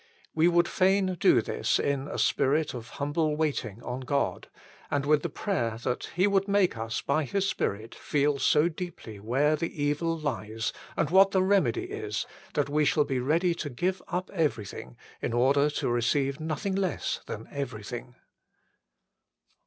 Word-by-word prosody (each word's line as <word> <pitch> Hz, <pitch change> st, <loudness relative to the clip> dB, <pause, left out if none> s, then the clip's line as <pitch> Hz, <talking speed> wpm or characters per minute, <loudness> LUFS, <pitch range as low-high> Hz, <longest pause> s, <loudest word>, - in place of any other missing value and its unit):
We 160 Hz, +1 st, +4 dB
would 175 Hz, 0 st, +4 dB
fain 190 Hz, 0 st, +2 dB
do -, -, +5 dB
this -, -, 0 dB
in 140 Hz, 0 st, -1 dB
a -, -, -5 dB
spirit 150 Hz, +3 st, +2 dB
of 120 Hz, -2 st, -7 dB
humble 150 Hz, +2 st, 0 dB
waiting 130 Hz, -8 st, -2 dB
on 125 Hz, +1 st, -4 dB
God, 140 Hz, +2 st, -1 dB, 0.4 s
and 140 Hz, -1 st, 0 dB
with 150 Hz, 0 st, +4 dB
the -, -, -3 dB
prayer 120 Hz, -, -2 dB
that 125 Hz, -, -1 dB
He 180 Hz, +3 st, +4 dB
would 200 Hz, -1 st, +2 dB
make 200 Hz, -, +3 dB
us 115 Hz, +1 st, -3 dB
by 155 Hz, +3 st, +1 dB
His 195 Hz, +8 st, 0 dB
Spirit 110 Hz, -, -2 dB
feel 145 Hz, -1 st, 0 dB
so 150 Hz, +4 st, +4 dB
deeply 165 Hz, -, -7 dB
where 135 Hz, +9 st, +2 dB
the 165 Hz, +2 st, -3 dB
evil 165 Hz, +3 st, 0 dB
lies 115 Hz, -7 st, -3 dB, 0.2 s
and -, -, +1 dB
what 190 Hz, +1 st, +7 dB
the 190 Hz, -1 st, +2 dB
remedy 200 Hz, -, +2 dB
is, 415 Hz, +2 st, -4 dB, 0.3 s
that 145 Hz, -1 st, +1 dB
we 150 Hz, +1 st, +2 dB
shall 150 Hz, 0 st, +3 dB
be 130 Hz, -2 st, -1 dB
ready 165 Hz, +7 st, +2 dB
to 155 Hz, -3 st, -5 dB
give 180 Hz, +8 st, -1 dB
up 180 Hz, +1 st, -3 dB
everything 110 Hz, -, -2 dB, 0.2 s
in -, -, -2 dB
order 140 Hz, +4 st, +3 dB
to 150 Hz, -, -2 dB
receive 135 Hz, +4 st, +1 dB
nothing 160 Hz, +5 st, -2 dB
less 190 Hz, -4 st, -1 dB
than 110 Hz, -, -6 dB
everything. 125 Hz, -3 st, -6 dB
150 Hz, 165 wpm, -28 LUFS, 125-175 Hz, 0.4 s, what